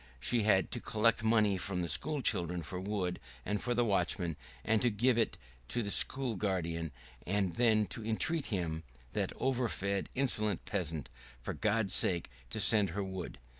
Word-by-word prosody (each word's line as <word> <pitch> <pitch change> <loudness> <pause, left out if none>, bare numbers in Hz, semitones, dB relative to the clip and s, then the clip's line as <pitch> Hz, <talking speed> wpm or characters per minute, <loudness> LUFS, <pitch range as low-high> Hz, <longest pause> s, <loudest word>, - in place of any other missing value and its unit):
She 115 - +2
had 95 -4 +2
to - - -3
collect 110 +1 +1
money 110 -3 +3
from 90 -1 -3
the - - -2
school 150 - +1
children 85 -3 0
for 90 +4 -6
wood 95 -2 -2 0.3
and 105 +1 -1
for 120 -1 -1
the 120 0 +2
watchman, 90 -4 0 0.3
and 110 0 +2
to 125 - +3
give 120 +4 +2
it 115 -1 0 0.3
to 120 - -1
the 100 - -2
school 130 0 +5
guardian, 85 -5 -2 0.4
and 95 -2 0
then 110 -3 +3
to 115 - -4
entreat 135 +8 0
him 85 -6 -2 0.3
that - - -2
overfed, 110 -7 -1
insolent 110 -7 +2
peasant 80 -8 -3 0.3
for - - -5
God's 105 -2 +1
sake 85 -3 +3 0.2
to - - -2
send 105 -3 +4
her 100 +4 -3
wood. 95 -2 -6
100 Hz, 170 wpm, -32 LUFS, 90-115 Hz, 0.4 s, school